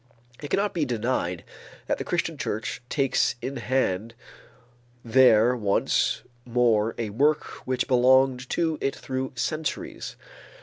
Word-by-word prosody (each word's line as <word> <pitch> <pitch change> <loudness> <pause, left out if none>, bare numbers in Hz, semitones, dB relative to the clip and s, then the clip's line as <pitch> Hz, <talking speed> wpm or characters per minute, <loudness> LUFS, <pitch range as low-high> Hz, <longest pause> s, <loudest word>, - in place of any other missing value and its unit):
It 145 - -6
cannot 200 0 0
be 165 - 0
denied 115 - -1 0.4
that - - -1
the - - -2
Christian - - -1
church 110 +4 -4
takes 135 -3 +1
in 135 +2 -5
hand 115 -3 -1 0.9
there 120 -1 +5
once 105 -4 +1 0.2
more 115 -3 +2
a 110 -3 -3
work 145 +7 +2 0.2
which 130 -1 0
belonged 130 0 +3
to 160 -3 0
it 135 - -1
through 130 0 -4
centuries. 155 +4 -3
125 Hz, 125 wpm, -25 LUFS, 115-135 Hz, 0.9 s, there